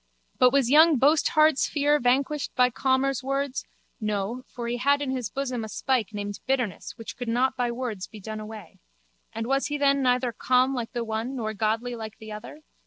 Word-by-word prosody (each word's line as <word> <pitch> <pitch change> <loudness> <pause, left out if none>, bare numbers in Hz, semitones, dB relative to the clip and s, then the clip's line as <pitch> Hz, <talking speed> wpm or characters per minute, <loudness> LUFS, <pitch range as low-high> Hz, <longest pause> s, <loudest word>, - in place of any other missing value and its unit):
But 250 - +7
was 270 -2 +2
young 310 0 +7
Boasthard's 305 +2 +4
fear 295 0 +2
vanquished 270 +4 0
by 250 0 +4
Calmer's 265 +1 +1
words? 275 0 -2 0.3
No, 210 +2 -2
for 235 -1 -6
he 240 +1 -1
had 280 +3 +3
in 285 -2 -2
his 250 -5 -3
bosom 255 -1 -3
a 220 - -6
spike 245 -2 0
named 205 -1 -5
Bitterness 250 -7 -1
which 225 - -8
could 245 - -6
not 250 +3 +1
by 245 -1 0
words 235 -6 -4
be 215 - -12
done 215 +2 -6
away. 215 -4 -10 0.5
And 225 0 -4
was 275 +3 +1
he 295 - -2
then 280 -1 +3
neither 250 -1 +2
calm 255 +3 +2
like 240 -3 -4
the 240 - -2
one 225 +4 -3
nor 220 -3 -3
godly 225 +3 -1
like 220 -2 -7
the 220 0 -10
other? 215 +8 -9
250 Hz, 195 wpm, -26 LUFS, 220-275 Hz, 0.5 s, But